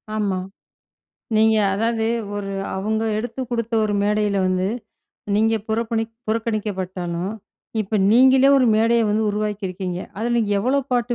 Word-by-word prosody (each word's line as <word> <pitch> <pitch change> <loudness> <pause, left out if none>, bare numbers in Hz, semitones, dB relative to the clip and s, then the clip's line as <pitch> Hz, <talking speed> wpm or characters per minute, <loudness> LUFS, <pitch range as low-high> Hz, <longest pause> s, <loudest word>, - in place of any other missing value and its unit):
ஆமா. 200 -3 0 1.0
நீங்க 220 0 +4 0.2
அதாவது 225 +1 0 0.3
ஒரு 195 -1 -4 0.2
அவுங்க 215 +3 -1
எடுத்து 230 +3 -4
குடுத்த 230 -1 -2
ஒரு 205 -1 -1
மேடைல 210 -1 +1
வந்து, 185 +1 0 0.7
நீங்க 225 +2 +3
புறபணிக் 225 0 -1 0.2
புறக்கணிக்கப்பட்டாலும், 195 -5 -2 0.5
இப்ப 210 +1 -1
நீங்களே 260 +3 +6
ஒரு 255 - +3
மேடைய 230 +1 +3
வந்து 215 +1 +1
உருவாக்கி 210 -1 -2
இருக்கீங்க. 180 -1 -4 0.2
அதுல 235 +3 -1
நீங்க 210 -3 0
எவ்வளவு 270 +4 0
பாட்டு 240 0 +1
220 Hz, 130 wpm, -21 LUFS, 200-230 Hz, 1.0 s, நீங்களே